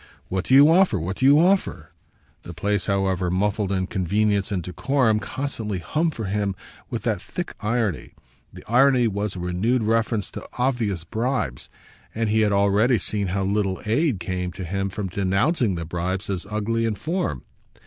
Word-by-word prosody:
"What 95 0 -2
do 130 - +4
you 140 +2 +9
offer, 170 - +4
what 90 +5 -4
do 130 - +1
you 145 +1 +7
offer?" 185 +4 +1 0.5
the 85 - -10
place, 100 +3 -1
however 95 -3 0
muffled 100 +2 0
in 95 -1 0
convenience 100 +2 0
and 95 -4 -1
decorum, 110 - +1
constantly 110 -3 -4
hummed 155 - -1
for 110 - -4
him 100 0 -1 0.3
with - - -4
that - - -1
thick - - -5
irony. 105 -5 -2 0.4
The - - -12
irony 125 0 +4
was 100 -1 -2
a - - -6
renewed 95 +8 0
reference 115 -1 0
to - - -9
obvious 120 -9 0
bribes, 110 - -2 0.5
and 115 -1 0
he 110 - +3
had 105 -1 +2
already 100 +5 +3
seen 105 -2 -1
how 95 +2 -1
little 100 -1 0
aid 120 - +1
came 90 0 -3
to 95 - -6
him 95 +3 -2
from 100 +1 -4
denouncing 100 - +1
the 85 -1 -4
bribes 90 +4 -3
as 95 0 -4
ugly 110 +2 -1
in 110 -2 0
form. 155 - -2
105 Hz, 175 wpm, -23 LUFS, 95-115 Hz, 0.5 s, you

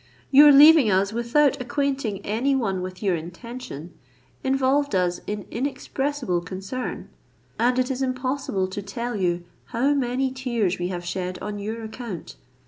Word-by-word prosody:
Your 290 +2 +9
leaving 295 -3 +8
us 195 +1 +2
without 255 +5 +2
acquainting 265 -6 -2
any 245 +7 +1
one 195 -8 -1
with 185 +2 -7
your 190 -3 +2
intention, 175 - -8 0.5
involved 270 -1 +1
us 180 -1 +1
in 210 -1 -4
inexpressible 270 -5 -2
concern; 190 +8 -5 0.5
and 245 +2 +2
it 255 +1 +1
is 265 0 -3
impossible 255 -6 -1
to 195 +2 -5
tell 235 +4 -4
you 175 -3 0 0.2
how 260 +5 +1
many 260 -1 0
tears 235 -8 -1
we 175 - -1
have 175 -1 -5
shed 180 0 -3
on 210 -1 -5
your 220 +3 -5
account. 220 -5 -7
235 Hz, 145 wpm, -24 LUFS, 190-265 Hz, 0.5 s, Your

